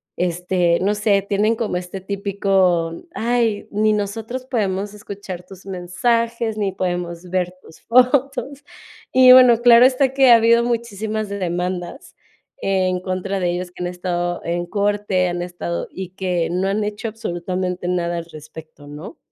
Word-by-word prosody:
Este, 180 0 0
no 205 +2 +1
sé, 205 -1 +2
tienen 205 +3 +1
como 215 -5 -2
este 180 +2 -5
típico: 190 -4 0
"Ay, 230 -3 0
ni 215 +1 +1
nosotros 220 +5 -3
podemos 205 -5 -2
escuchar 200 -3 -8
tus 190 0 -14
mensajes, 225 +5 -1
ni 200 -2 0
podemos 175 -1 -4
ver 180 0 -1
tus - - -17
fotos". 270 +3 +2 0.5
Y 255 -1 +8
bueno, 245 -2 +7
claro 240 0 +7
está 265 0 +2
que 270 -2 +5
ha 235 - +10
habido 235 +1 +4
muchísimas 220 -2 -2
demandas 180 +2 -4 0.5
en 185 -2 0
contra 185 +1 -3
de 175 -2 0
ellos, 180 0 -4
que - - -11
han - - -1
estado 175 -1 -3
en 175 +1 -2
corte, 200 -1 0
han 175 0 -3
estado 175 -1 -4
y 190 -1 -7
que 180 -3 -2
no 185 +2 0
han 205 +2 0
hecho 210 +2 -4
absolutamente 180 -3 -4
nada 175 -1 -1
al 170 - -5
respecto, 155 -1 -12
¿no? 150 - -9
195 Hz, 150 wpm, -20 LUFS, 180-220 Hz, 0.5 s, ha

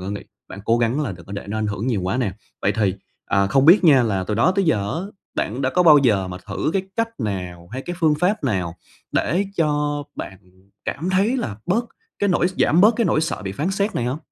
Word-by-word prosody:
có 95 +2 -5
nghĩ 100 - -4 0.3
bạn 100 - -9
cố 115 +1 +2
gắng 120 +5 +1
là 130 -10 -2
đừng 85 -2 -13
có 100 - -9
để 100 - -5
nó 110 +1 -2
ảnh 110 - -1
hưởng 105 +3 -3
nhiều 115 -6 0
quá 95 +7 -1
nè. 120 -7 0 0.3
Vậy - - +2
thì, 100 -4 +1 0.3
ờ, 100 -1 +2
không 135 +7 +3
biết 180 +4 +7
nha 140 -6 +7
là 100 -5 0
từ 105 - -2
đó 140 - +3
tới 195 - +3
giờ 100 -11 0
á 165 - -2 0.4
bạn 125 +6 -2
đã 130 - +1
có 180 - +3
bao 155 -4 +8
giờ 105 -8 +2
mà 90 - -6
thử 100 +9 -2
cái 195 - +1
cách 230 0 +1
nào 90 -4 -4
hay 130 - -4
cái 175 +3 -5
phương 155 -3 +3
pháp 195 0 +1
nào 90 -9 -1 0.4
để 175 +10 +1
cho 150 -2 0
bạn 95 - -7 0.5
cảm 175 +5 -3
thấy 200 +7 +2
là 110 - -3
bớt 225 +7 +1 0.3
cái 205 - +1
nỗi 175 0 +2
s 190 - -10
giảm 165 +4 +4
bớt 215 +3 +6
cái 235 - +2
nỗi 155 - +2
sợ 160 -9 -2
bị 95 -1 -4
phán 155 - -2
xét 200 +2 -1
này 120 - -1
hông? 130 +5 -2
130 Hz, 260 wpm, -22 LUFS, -, 0.5 s, bao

